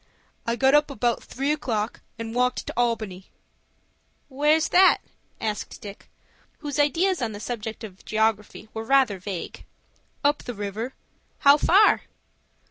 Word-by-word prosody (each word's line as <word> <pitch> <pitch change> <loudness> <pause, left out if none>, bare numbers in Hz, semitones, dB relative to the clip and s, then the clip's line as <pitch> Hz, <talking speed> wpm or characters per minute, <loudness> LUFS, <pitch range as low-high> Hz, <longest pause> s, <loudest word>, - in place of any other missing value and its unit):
"I 235 - +1
got 265 +2 +3
up 295 0 +4
about 245 -4 0
three 275 +3 -2
o'clock, 230 -8 -2 0.2
and 225 -1 -5
walked 250 +1 0
to - - -5
Albany." 220 -6 -1 1.0
"Where's 300 +4 +2
that?" 370 +1 +6 0.4
asked 215 -2 -4
Dick, 205 -1 -11 0.5
whose 295 -1 -4
ideas 330 +5 +2
on 225 -3 -2
the 205 - -7
subject 220 0 -5
of 195 -3 -10
geography 215 -1 -1
were 220 - -4
rather 250 -5 +3
vague. 185 -1 -6 0.6
"Up 290 +1 +2
the 245 - -6
river." 210 +5 -5 0.5
"How 280 -1 +8
far?" 380 +8 +5
240 Hz, 135 wpm, -25 LUFS, 215-285 Hz, 1.0 s, How